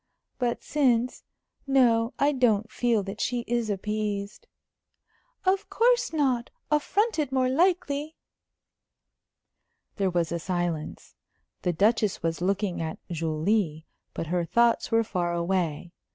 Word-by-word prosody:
"But 240 -2 -1
since 250 -4 +1 0.4
No, 245 -3 +3
I 285 +1 +3
don't 225 -5 +2
feel 235 -4 +1
that 195 +3 -6
she 245 -1 0
is 235 -1 -1
appeased." 205 0 -3 1.0
"Of 380 +1 +1
course 485 +1 +2
not. 265 -6 0 0.2
Affronted, 305 - +1
more 260 -1 +2
likely." 315 -1 +1 1.8
There 195 -2 +1
was 175 -2 0
a 170 - -1
silence. 175 -3 -3 0.5
The 180 - +1
Duchess 210 +2 +1
was 165 0 -1
looking 195 -1 0
at 160 -1 -4
Julie, 160 +1 0 0.3
but - - -3
her 175 +2 0
thoughts 235 +9 +2
were 230 0 +4
far 175 -5 -2
away. 170 -2 -1
220 Hz, 120 wpm, -27 LUFS, 175-260 Hz, 1.8 s, were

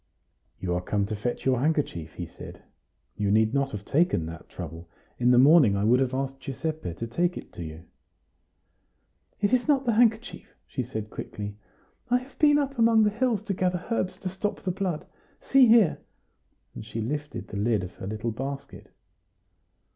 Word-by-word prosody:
"You 90 -2 -2
are 90 - 0
come 100 +2 0
to 110 +1 -3
fetch 120 +4 -3
your 130 -2 +3
handkerchief," 135 - -1
he - - -4
said. - - -11 0.5
"You 105 -1 0
need 110 +2 +3
not 140 -1 +1
have 105 -1 -6
taken 150 - +2
that 85 +1 -9
trouble. 85 -1 -8 0.3
In 125 0 +3
the 125 - +6
morning 135 -5 +7
I 100 - 0
would 120 +4 +4
have 130 -1 0
asked 135 0 -3
Giuseppe 135 - -4
to 115 - -4
take 175 +10 0
it - - -10
to 85 - -6
you." 80 +1 -8 1.6
"It 205 +4 +2
is 255 +2 +2
not 275 -3 +3
the 235 - +3
handkerchief," 225 0 +1
she - - -4
said 110 -2 -5
quickly. 105 0 -6 0.5
"I 245 - +4
have 255 +2 -11
been 295 -1 +6
up 275 -3 -1
among 225 -1 +5
the 210 - +3
hills 225 -2 0
to 210 -3 -2
gather 180 -1 -1
herbs 185 -5 -1
to 185 - -3
stop 195 +3 -3
the 185 - 0
blood; 180 -4 -3 0.3
see 270 -2 +5
here." 220 -7 +5 0.7
And - - -8
she 110 +1 -6
lifted 145 +6 -4
the - - -5
lid 105 -1 +1
of 90 +2 -7
her 95 - -6
little 110 +3 -3
basket. 135 +4 -6
135 Hz, 185 wpm, -27 LUFS, -, 1.6 s, morning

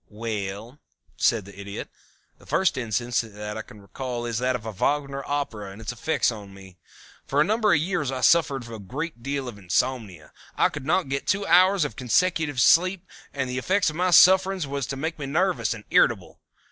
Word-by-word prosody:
"Well," 110 +3 -5 0.4
said 110 -5 +1
the 100 0 -13
Idiot, 100 0 -6 0.5
"the - - -19
first 190 -2 +2
instance 120 -1 -1
that 105 -1 -7
I 110 - -4
can 105 - -14
recall 120 +4 -5
is 115 -1 -2
that 125 0 0
of 115 -3 -6
a 110 - -4
Wagner 140 +6 -1
Opera 130 -8 -3
and 95 +2 -11
its 115 +1 -5
effects 120 +3 0
upon 100 -3 -10
me. 95 -2 -15 0.5
For 140 - 0
a - - +6
number 215 +3 +2
of 150 - +4
years 165 -4 -1
I 130 -1 -4
suffered 140 -7 +3
a 115 -1 -8
great 130 - -6
deal 140 +1 -3
from 115 -5 -8
insomnia. 95 -3 -2 0.2
I - - +4
could 145 -5 -8
not 170 -3 +1
get 140 0 -3
two 200 0 +1
hours 185 -2 +5
of 115 - -6
consecutive 145 +2 +1
sleep 185 +8 +4 0.3
and 130 -2 -3
the 125 +1 -3
effect 185 +3 +1
of - - -11
my 180 +2 +1
sufferings 190 0 +5
was 140 -2 -3
to 135 - -5
make 160 +3 -4
me 140 - -4
nervous 175 +6 0
and 110 -2 -5
irritable. - - +2
130 Hz, 200 wpm, -25 LUFS, 110-160 Hz, 0.5 s, a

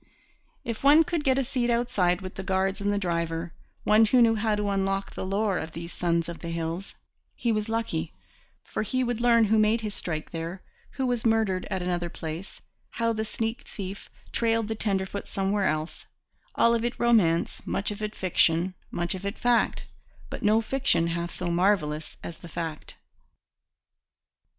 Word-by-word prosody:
If 230 +1 -5
one 295 +3 +7
could 340 -2 -2
get 265 -2 +3
a 270 - +2
seat 250 -1 -1
outside 235 -7 +2
with 185 0 -6
the - - -5
guards 190 +1 0
and 205 0 +1
the 205 - +1
driver 170 -2 -2 0.3
one 215 +1 +6
who 250 +4 +4
knew 230 -1 +6
how 215 -1 +1
to 205 -1 -1
unlock 195 0 -1
the - - -4
lore 195 0 0
of 160 0 -6
these 170 +1 -7
sons 170 -1 0
of 170 -1 -6
the 170 - -6
hills 165 +3 -4 0.4
he 235 - 0
was 215 0 -1
lucky; 225 -8 -1 0.5
for - - -3
he 255 +4 0
would 240 -1 -1
learn 235 -1 +5
who 220 +1 +3
made 215 +2 +3
his 210 -2 -3
strike 155 -5 -4
there, 170 +3 -5 0.3
who 265 - -1
was 245 -2 0
murdered 220 -5 +2
at 190 -1 -2
another 175 -1 -1
place, 165 +4 -7 0.3
how 230 0 0
the 220 0 -1
sneak 225 +4 -3
thief 195 -1 -7 0.2
trailed 225 -2 +1
the - - 0
tenderfoot 200 -2 -2
somewhere 195 0 0
else 155 +1 -3 0.5
all 235 - +5
of 230 -1 +1
it 240 0 -2
romance, 210 -9 +3
much 200 - 0
of 210 - -6
it 215 0 -3
fiction, 180 0 +2 0.2
much 175 0 -2
of 190 0 -6
it 200 +2 -3
fact, 245 -1 +2 0.5
but - - -5
no 215 +2 +4
fiction 240 -8 +1
half 170 +1 -2
so 175 0 -3
marvellous 170 -4 +1
as 170 - -7
the 170 - -11
fact. 165 -1 -5
200 Hz, 185 wpm, -27 LUFS, 175-225 Hz, 0.5 s, one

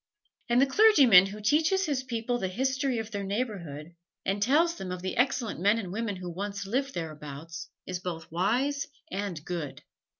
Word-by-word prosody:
And 240 +1 +4
the 270 - +6
clergyman 270 - +7
who 205 +2 -8
teaches 315 - +2
his 285 -5 0
people 245 -1 -2
the 190 - -1
history 265 +5 0
of 225 0 -4
their 200 -2 -3
neighborhood, 190 - -4 0.3
and 195 +1 0
tells 305 +9 +4
them 190 - -7
of 180 0 -5
the 185 - -2
excellent 245 - 0
men 205 +5 +4
and 190 -5 -4
women 220 -1 -2
who 180 -1 -6
once 200 +3 -4
lived 270 +7 -1
thereabouts, 155 0 -6 0.2
is 180 -1 -4
both 170 -3 -6
wise 250 - 0 0.2
and 190 -5 -4
good. 170 -5 -5
205 Hz, 175 wpm, -28 LUFS, 180-260 Hz, 0.3 s, clergyman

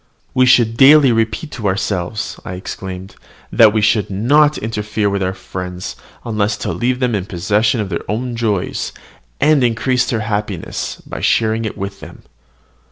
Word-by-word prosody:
"We 130 -2 +4
should 120 -3 +4
daily 140 0 +7
repeat 115 +7 -1
to 110 - -3
ourselves," 95 +1 -2
I 95 - -6
exclaimed, 95 0 -7 0.4
"that 110 -2 +6
we 110 0 +1
should 105 -1 +2
not 145 +10 +3
interfere 105 -1 -2
with 100 0 -1
our 95 0 -1
friends, 90 -1 -6 0.3
unless 105 -2 0
to - - -3
leave 125 +1 -1
them 125 -2 0
in 100 -2 -2
possession 105 +6 +1
of 105 -3 -2
their 85 - -5
own 120 +3 -2
joys, 110 -5 -2 0.5
and 150 -2 +4
increase 125 +2 +1
their 115 -3 -1
happiness 105 -4 -3
by - - -7
sharing 110 0 +1
it 110 - -5
with 100 0 -5
them! - - -12
110 Hz, 165 wpm, -17 LUFS, 100-120 Hz, 0.5 s, daily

